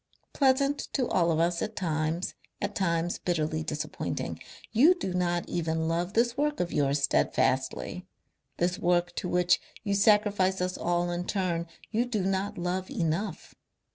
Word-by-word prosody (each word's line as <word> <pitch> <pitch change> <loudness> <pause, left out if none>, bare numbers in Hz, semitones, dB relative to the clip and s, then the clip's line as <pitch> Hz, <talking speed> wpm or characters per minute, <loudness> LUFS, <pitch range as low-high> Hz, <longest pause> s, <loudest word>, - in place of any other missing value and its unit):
Pleasant 275 +1 +3
to 255 - +1
all 170 -2 +2
of 160 - +1
us 170 +1 +1
at 220 0 -3
times 160 0 -1 0.3
at - - -2
times 170 -2 0
bitterly 160 -2 -1
disappointing. 150 -1 -4 0.3
You 295 +11 +6
do 190 - -3
not 175 -1 0
even 160 -1 -1
love 175 +3 -1
this 235 +1 +2
work 295 +1 0
of 175 -1 -1
yours 140 -1 +1
steadfastly, 135 +6 0 0.5
this 175 +1 0
work 175 0 +2
to 180 - -2
which 180 0 +3 0.2
you 200 -2 0
sacrifice 200 -2 +3
us 180 0 -1
all 175 0 0
in 175 +1 -3
turn. 175 -4 -1 0.2
You 230 +2 +1
do 220 -6 -1
not 195 +1 -1
love 180 +3 -2
enough. 195 - -2
180 Hz, 155 wpm, -28 LUFS, 170-205 Hz, 0.5 s, You